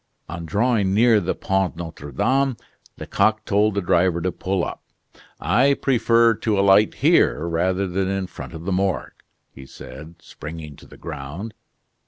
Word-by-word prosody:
On 85 0 -7
drawing 105 -1 +1
near 115 0 +5
the 95 -2 -2
Pont 95 -2 -1
Notre 80 -4 -8
Dame, 135 - +1 0.4
Lecoq 110 +2 0
told 105 +1 +2
the 100 - 0
driver 90 0 +2
to 90 +2 -1
pull 95 0 -2
up. - - -7 0.6
"I 135 +5 +3
prefer 115 -3 +3
to 110 -3 -1
alight 100 +2 +4
here, 80 +3 +3
rather 90 +3 0
than 95 +1 -1
in 95 0 -2
front 90 - -10
of 80 +1 -9
the 100 - -2
Morgue," 95 0 -1 0.4
he 65 0 -13
said, 75 +7 -11
springing 80 -2 -9
to - - -16
the - - -15
ground. 80 +11 -7
95 Hz, 160 wpm, -22 LUFS, 85-110 Hz, 0.6 s, near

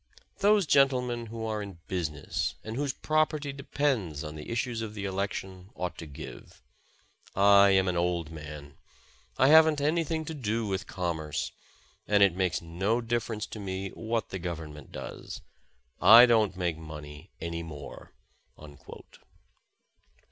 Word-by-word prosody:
Those 205 -1 +4
gentlemen 125 -5 +2
who 110 0 -5
are 110 -1 -2
in 100 -4 -8
business, 85 0 -2
and 110 +1 -6
whose 140 +1 -1
property 155 -1 0
de 140 0 -9
pends 110 - -1
on 75 -1 -6
the 75 -1 -9
issues 115 0 -2
of 110 -1 -6
the 100 -1 -4
election, 95 -1 -4
ought 90 -1 -3
to 80 - -7
give. 70 -3 -11 0.7
I 100 0 +7
am 95 -1 +4
an 90 - 0
old 85 -2 -1
man. 75 -3 -9 0.6
I 130 - +5
haven 160 0 +7
^t 145 -1 -2
anything 160 0 0
to 160 - -5
do 115 -5 -2
with 95 -1 -3
commerce, 80 -5 -3 0.6
and 105 -1 +5
it 100 -3 +5
makes 90 -3 0
no 95 +8 0
difference 115 -2 -2
to 110 - -6
me 95 -1 -4
what 115 +1 -3
the 95 - -5
Government 80 -4 -7
does. 65 - -8 0.6
I 115 +4 +10
don't 110 -6 +2
make 85 -3 -1
money 75 +1 -10
any 85 0 -4
more." 75 -4 -9
100 Hz, 150 wpm, -29 LUFS, 85-120 Hz, 0.7 s, I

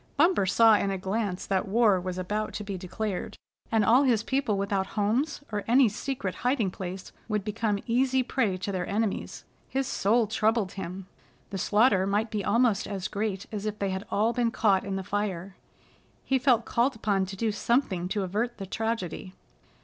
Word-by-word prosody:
Bumper 330 - +4
saw 225 +2 +6
in 200 - 0
a 195 - -1
glance 190 0 -2
that 190 -1 0
war 205 -2 +3
was 185 0 -4
about 210 +4 -2
to 210 - -4
be 200 -1 -5
declared, 190 +2 -4 0.3
and 220 -2 +3
all 245 +4 +6
his 240 -6 +2
people 265 -6 0
without 195 -1 -1
homes 225 +11 0
or 205 -1 -2
any 250 +2 +6
secret 215 -2 -3
hiding 245 -6 0
place 185 0 -7 0.2
would 210 -3 -1
become 215 0 -1
easy 255 +2 +2
prey 225 -7 0
to 200 +2 -4
their 180 -2 -3
enemies. 210 0 -2 0.2
His 270 0 -1
soul 230 -2 +2
troubled 220 -2 +1
him. 190 0 -6 0.5
The 195 - -3
slaughter 205 -2 +3
might 210 +3 0
be 210 -2 -2
almost 230 -1 +2
as 195 -3 -3
great 205 -1 -3
as 210 -1 -4
if 210 0 -3
they 200 -2 -1
had 190 +2 -4
all 220 +3 +1
been 240 -1 +1
caught 200 -4 +2
in 195 -1 -3
the 190 - -3
fire. 195 -2 -3 0.7
He 265 -1 +2
felt 245 -3 +3
called 245 +3 +1
upon 200 -3 0
to 195 - -6
do 220 +2 0
something 205 -5 0
to 205 0 -1
avert 220 +6 -2
the 195 - -5
tragedy. 195 -3 -3
210 Hz, 190 wpm, -27 LUFS, 195-230 Hz, 0.7 s, saw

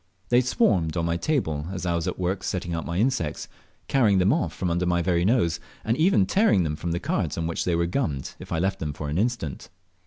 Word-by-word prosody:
They 120 +1 +5
swarmed 90 -9 +1
on 85 - 0
my 85 0 0
table 85 - -1
as 90 -2 -4
I 85 - +1
was 85 +1 -1
at 90 - -2
work 95 +1 -1
setting 90 -3 -3
out 85 - -3
my 85 - -2
insects, 100 - 0 0.4
carrying 110 -8 +3
them 95 +5 +4
off 165 0 0
from 90 -2 -2
under 90 +1 0
my 85 -1 +1
very 85 -1 +1
nose, 90 -6 +2 0.3
and 115 - +2
even 155 - +4
tearing 190 - +3
them 75 -2 -1
from 85 +2 -4
the 85 - -1
cards - - -1
on 85 - -1
which 85 0 -2
they 90 - +1
were 85 0 +1
gummed 85 - -2
if - - -11
I - - 0
left 95 +3 0
them 75 -2 -3
for 75 0 -5
an 75 +5 -1
instant. 110 - -2
90 Hz, 245 wpm, -25 LUFS, 85-105 Hz, 0.4 s, They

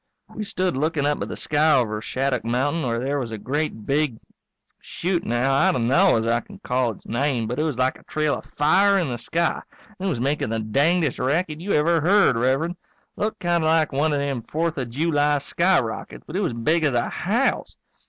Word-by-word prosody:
We 215 - -4
stood 185 -5 -1
looking 150 +1 0
up 145 0 0
at - - -2
the - - -5
sky 150 0 +2
over 110 -4 0
Shattuck 130 +1 -1
mountain 130 +8 0
where 120 -5 -1
there 140 +3 -1
was 120 -4 -4
a 110 - -5
great 130 -1 -3
big 140 -4 0 0.6
shoot 175 0 -2
now, 120 +4 +1
I 140 +3 +4
d'no 130 +9 +3
as 110 - -1
I 115 +1 +2
can 200 +10 -13
call 125 - 0
its 110 - -9
name 125 -1 -1
but 125 +5 -3
it - - +2
was 155 -6 -2
like 130 +1 0
a - - -21
trail 155 -1 0
of - - -5
fire 195 +7 +4
in 175 -7 0
the 120 -1 -4
sky, 165 +8 -1 0.4
and 190 - -2
it - - +1
was 145 -10 -2
makin' 140 -2 -1
the 115 - -1
dangdest 145 +8 +1
racket 155 +4 -1
you 200 +3 -2
ever 165 +2 +3
heard, 190 - +4
Rev'rend. 135 +9 0 0.4
Looked 215 +1 -3
kind 175 -2 +1
of - - +1
like 160 -1 +2
one 145 +3 +1
of 145 - +1
them 140 -3 -2
Fourth 160 +5 -2
of 125 -3 -3
July 145 +2 +1
skyrockets, 170 -4 -1
but 160 - -9
it 200 - 0
was 175 -10 -1
big 155 +9 +1
as 145 -5 +1
a 120 - +1
house. 225 +10 -1
145 Hz, 220 wpm, -23 LUFS, 125-170 Hz, 0.6 s, I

